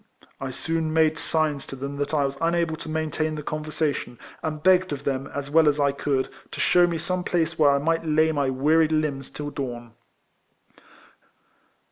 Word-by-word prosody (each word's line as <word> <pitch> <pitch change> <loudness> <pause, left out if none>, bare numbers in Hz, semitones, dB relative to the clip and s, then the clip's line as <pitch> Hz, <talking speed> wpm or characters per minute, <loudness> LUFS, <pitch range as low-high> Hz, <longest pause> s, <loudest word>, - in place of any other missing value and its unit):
I 135 - -4
soon 160 +4 -2
made 160 0 +3
signs 155 -3 0
to - - -7
them 140 +2 -5
that 145 0 -2
I 145 -3 +2
was 135 0 -3
unable 170 -1 +1
to 160 - -8
maintain 155 0 -1
the 150 - -6
conversation, 150 -4 -2 0.2
and 155 -1 -4
begged 185 -1 +4
of 145 -1 -4
them, 135 -1 -2
as 140 0 -6
well 160 0 +5
as 145 0 -1
I 140 -1 +3
could, 140 -1 -1 0.2
to - - -8
shew 175 -1 +5
me 170 -1 -2
some 180 +2 -2
place 165 -3 -1
where 150 -2 +6
I 140 - +4
might 165 +3 0
lay 160 0 +3
my 140 -3 0
wearied 155 +4 +3
limbs 150 -4 -1
till 145 0 -6
dawn. 120 -5 -6
155 Hz, 185 wpm, -25 LUFS, 140-160 Hz, 0.2 s, where